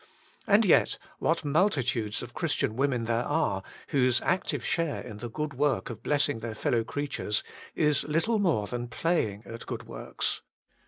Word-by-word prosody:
And 210 +1 +5
yet 180 - +4 0.2
what 165 -1 +1
multitudes 130 - +1
of - - -9
Christian 110 - 0
women 130 -3 +1
there 115 +1 +1
are 105 -11 +1 0.3
whose 130 -3 +3
active 185 +1 0
share 165 -3 0
in 110 - -8
the 120 +2 -5
good 150 +5 -3
work 140 -1 +1
of 115 - -8
blessing 145 -4 +1
their 110 -1 -5
fellow 115 +2 +1
creatures 140 -6 -1 0.3
is 150 -2 +3
little 165 +9 +1
more 165 - +2
than 120 +3 -4
playing 115 - 0
at 115 0 -8
good - - -4
works. - - -2
135 Hz, 160 wpm, -29 LUFS, 115-155 Hz, 0.3 s, And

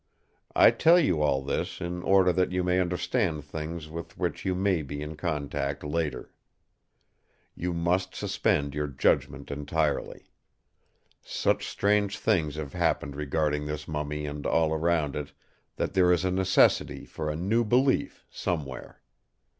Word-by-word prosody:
I - - +8
tell 170 +2 +5
you 90 - +2
all 70 -3 +2
this 70 - -3
in 90 +1 -4
order 95 -1 +4
that 90 +1 +1
you 90 0 0
may 90 +1 +2
understand 90 - 0
things 80 +2 -6
with 85 +1 -8
which - - -2
you 95 -1 +1
may 95 -2 +1
be 75 0 -5
in 75 +1 -6
contact 75 -4 -3
later. 75 0 -3 1.2
You 90 +1 -3
must 90 +2 0
suspend 70 -1 0
your 75 +1 -2
judgment 70 0 0
entirely. 75 +1 -2 0.9
Such - - 0
strange 100 0 +1
things 80 -9 +1
have 75 -3 -6
happened 70 -1 0
regarding 75 0 -1
this 75 0 -5
mummy 75 -1 -3
and 75 0 -4
all 80 -1 +2
around 80 -3 +1
it, 75 -1 -5 0.4
that - - -2
there 90 -2 +4
is 90 +1 +2
a 90 - +1
necessity 95 +1 +2
for 75 -1 -4
new 100 +9 +1
belief 125 +5 +1
somewhere. 70 -7 -4
80 Hz, 145 wpm, -27 LUFS, 75-90 Hz, 1.2 s, I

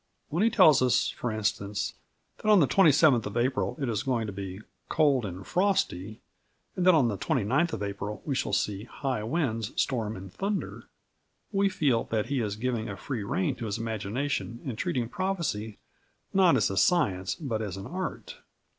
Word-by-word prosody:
When 165 +5 -1
he 225 - +5
tells 155 - +6
us, 125 -1 +3
for 120 - -4
instance, 105 -1 -2 0.4
that 215 - -2
on 210 -2 +7
the 145 - +4
27th 150 - +5
of 105 +3 -5
April 130 +6 0
it 135 - -1
is 110 -3 -1
going 120 -4 0
to 105 - -5
be 95 0 -6 0.3
"cold 145 -7 +3
and 95 +1 -8
frosty" 180 - 0 0.5
and 180 0 0
that 185 - +8
on 140 -6 +4
the 100 -5 -2
29th 135 - +1
of 105 - -3
April 100 +1 -5
we 145 - -1
shall 130 - -1
see 105 0 -1
"high 130 -2 -3
winds, 115 -3 -2
storms 115 -5 -1
and 95 0 -10
thunder," 200 0 -3 0.7
we 200 -1 +2
feel 135 -10 +1
that 110 -2 -1
he 140 -3 0
is 105 -2 -2
giving 115 -1 -2
a 100 - -6
free 120 +2 -4
rein 155 - 0
to 115 - -4
his 100 - -2
imagination 115 +3 -3
and 130 -5 -3
treating 120 +2 -1
prophecy 150 - -2 0.6
not 185 -7 +5
as 105 - +1
a 95 - -3
science 95 - +2
but 120 -9 -3
as 100 -4 -4
an 95 - -7
art. 185 - -5
120 Hz, 185 wpm, -28 LUFS, 105-155 Hz, 0.7 s, that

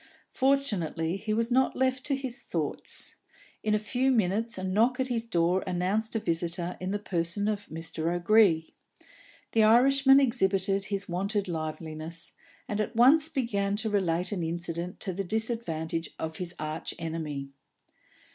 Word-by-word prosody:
Fortunately, 190 - 0
he 215 +2 -4
was 230 +2 0
not 260 +2 +3
left 260 0 +1
to 280 - +1
his 265 -1 -5
thoughts; - - -4 0.4
in 215 0 +1
a - - +4
few 245 +5 0
minutes 225 -1 +1
a 185 - -5
knock 225 +7 +2
at 260 0 0
his 230 -2 -1
door 180 -3 +1
announced 190 +5 -1
a - - +2
visitor 170 0 -2
in 185 - -3
the 205 - 0
person 190 0 -1
of 205 -1 -2
Mr. 165 0 -2
O'Gree. 175 -2 +3 0.8
The 225 - +3
Irishman 270 +5 +6
exhibited 195 -6 +1
his 200 -1 -3
wonted 195 +3 -1
liveliness, 160 0 -5 0.4
and 210 0 -1
at 220 +2 -4
once 290 +7 +6
began 205 -9 0
to 215 +1 0
relate 180 -3 0
an 195 -4 -2
incident 170 +1 -4
to 190 - -1
the 195 +3 -2
disadvantage 175 -6 -2
of 160 0 -4
his 180 -1 -4
archenemy. 155 -2 -4
200 Hz, 150 wpm, -28 LUFS, 170-230 Hz, 0.8 s, Irishman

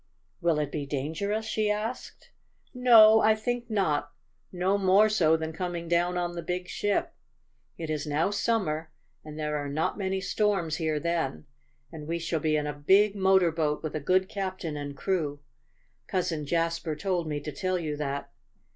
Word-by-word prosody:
"Will 170 -3 +2
it 150 -2 -1
be 145 -2 -4
dangerous?" 160 +11 -2
she 215 -1 0
asked. 215 +4 -4 0.4
"No, 225 -4 +7
I 215 0 +5
think 240 +2 -3
not. 150 -9 0 0.4
No 185 +2 +1
more 195 +3 +5
so 160 -7 +3
than 160 0 -4
coming 175 0 -4
down 175 +1 +1
on 175 -1 -2
the 170 - -4
big 180 +2 -4
ship. 205 +1 -1 0.6
It 160 -2 -4
is 155 -1 -3
now 155 +6 +1
summer, 180 -8 -1 0.3
and 155 0 -9
there 150 -1 -2
are 145 -1 -4
not 155 +8 -1
many 190 -1 -1
storms 190 -5 0
here 160 -2 -1
then. 165 - -2 0.5
And 150 -2 -9
we 165 +1 -1
shall 165 -1 -2
be 155 0 +1
in 150 -1 0
a 150 - -3
big 195 +8 +3
motor 190 -3 +4
boat 155 -2 -1
with 155 - -4
a - - -1
good 185 +5 +2
captain 185 -6 -4
and 145 -1 -6
crew. 150 -7 -1 0.7
Cousin 165 -5 -2
Jasper 165 0 -1
told 175 0 -1
me 150 -1 -2
to 150 +1 -6
tell 185 +5 -1
you 155 -4 -3
that. 140 -1 -4
170 Hz, 175 wpm, -28 LUFS, 150-195 Hz, 0.7 s, No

